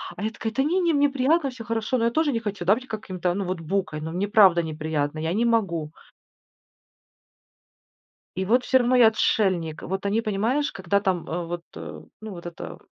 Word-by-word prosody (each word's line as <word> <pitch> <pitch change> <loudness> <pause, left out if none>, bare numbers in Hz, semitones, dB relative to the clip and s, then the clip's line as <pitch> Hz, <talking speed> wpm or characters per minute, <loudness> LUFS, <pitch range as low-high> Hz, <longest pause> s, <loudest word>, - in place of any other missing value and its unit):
А 190 - -7
я 220 - -1
такая: 225 0 -4
"Та 270 +4 0
не 340 +6 +1
не, 340 -3 +2
мне 285 -1 +4
приятно, 280 +3 +1
всё 250 -2 -9
хорошо". 225 +2 -1
Но 230 - +1
я - - +3
тоже 310 +3 +1
не 230 - -1
хочу, 205 -5 -5
да, 195 - +6
быть 255 +2 -9
каким-то, 185 -5 -3
ну, 200 0 -2
вот 180 -1 -3
букой, 165 -2 -2
но 160 +1 -5
мне 185 +4 -1
правда 195 -5 +5
неприятно, 155 -1 -3
я 160 +2 -1
не 225 +4 +1
могу. 180 -10 0 2.5
И 190 - -1
вот 245 +6 +3
всё 260 - +4
равно 250 +1 +2
я 245 -3 +7
отшельник. 185 -7 +1
Вот 190 +2 -4
они, 210 +3 +1
понимаешь, 230 +7 0
когда 190 +1 0
там, 185 -4 -1
э, 175 +1 -3
вот, 170 0 -5
э, - - -8 0.2
ну, 215 0 -7
вот 175 -2 -9
эта, 175 -1 -8
200 Hz, 210 wpm, -24 LUFS, 175-235 Hz, 2.5 s, я